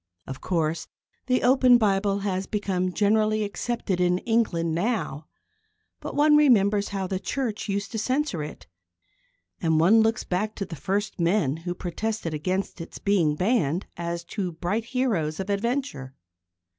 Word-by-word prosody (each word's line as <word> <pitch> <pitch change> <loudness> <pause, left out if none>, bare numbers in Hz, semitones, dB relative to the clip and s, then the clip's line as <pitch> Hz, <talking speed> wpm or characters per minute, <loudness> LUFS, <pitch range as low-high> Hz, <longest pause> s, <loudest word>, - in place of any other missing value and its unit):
Of 135 0 -8
course, 160 -2 -1 0.4
the 255 -1 +2
open 255 -1 +6
Bible 200 -2 +1
has 190 -1 -2
become 185 -3 -1
generally 215 +2 +2
accepted 205 -3 -2
in 180 0 +3
England 185 -7 0
now, 170 - -2 0.7
but - - -6
one 300 +1 +5
remembers 210 -8 +4
how 195 -2 -3
the 185 0 -2
Church 225 -3 -3
used 200 0 -2
to 220 - -3
censor 255 - -1
it, 150 0 -8 1.0
and 160 -1 +2
one 205 +8 +6
looks 225 +2 +1
back 210 +4 -2
to 195 - -3
the 175 - -7
first 195 +8 -2
men 170 -4 +1
who 175 +2 -5
protested 190 0 -3
against 185 +4 -2
its 165 - -8
being 175 -7 +2
banned 180 - +1
as 170 0 -4
to 180 0 -4
bright 185 +7 -2
heroes 220 -12 -1
of 190 +1 -2
adventure. 200 - -2
195 Hz, 150 wpm, -25 LUFS, 170-220 Hz, 1.0 s, open